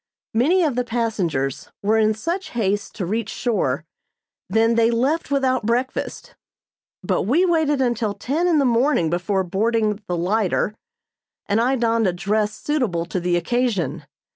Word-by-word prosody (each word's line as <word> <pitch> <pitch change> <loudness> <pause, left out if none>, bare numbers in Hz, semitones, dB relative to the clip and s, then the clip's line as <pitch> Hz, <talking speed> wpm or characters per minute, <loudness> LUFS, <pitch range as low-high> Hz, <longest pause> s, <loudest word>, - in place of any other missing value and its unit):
Many 315 +11 +3
of 300 -5 +1
the 250 +1 0
passengers 205 - -2
were 220 +2 +3
in 215 0 +3
such 340 - -3
haste 205 -2 -1
to 185 - -3
reach 220 +4 -2
shore 160 - -1 0.6
than 225 +1 +3
they 230 0 +3
left 265 +8 0
without 260 -5 +1
breakfast; 255 - -2 0.7
but - - 0
we 295 - +2
waited 315 -5 +2
until 235 -4 0
ten 295 - -1
in 335 -3 +3
the 280 - +3
morning 240 - +2
before 190 +2 0
boarding 210 +3 0
the 175 - -1
"lighter," 195 +3 0 0.7
and 205 +3 +1
I 255 +3 +2
donned 230 -3 +1
a 180 - +1
dress 210 +4 0
suitable 235 - -1
to 180 +2 -3
the 175 0 +1
occasion. 175 - -1
225 Hz, 155 wpm, -22 LUFS, 195-255 Hz, 0.7 s, Many